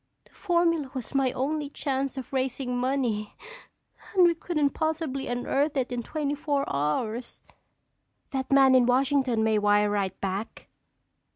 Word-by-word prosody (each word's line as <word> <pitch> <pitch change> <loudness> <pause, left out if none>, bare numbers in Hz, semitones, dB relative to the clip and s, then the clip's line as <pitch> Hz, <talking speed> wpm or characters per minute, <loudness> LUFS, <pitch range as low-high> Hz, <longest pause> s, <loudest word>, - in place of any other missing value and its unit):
"The - - -26
formula 340 -6 +1
was 255 -4 -5
my 270 -2 +2
only 290 +2 -2
chance 275 -1 -2
of 265 0 -7
raising 260 -1 -1
money 245 -5 -1 0.8
and 370 - +6
we 345 - +5
couldn't 310 -4 0
possibly 315 -4 -2
unearth 275 +4 0
it 255 -1 -1
in 245 -1 -2
twenty 290 +3 -2
four 285 -1 -1
hours." 215 - -2 0.9
"That 265 -1 -3
man 270 -1 +6
in 250 -2 +5
Washington 260 -2 +2
may 220 -1 +2
wire 205 0 +3
right 195 -2 -2
back." 195 +3 -5
265 Hz, 145 wpm, -27 LUFS, 235-285 Hz, 0.9 s, and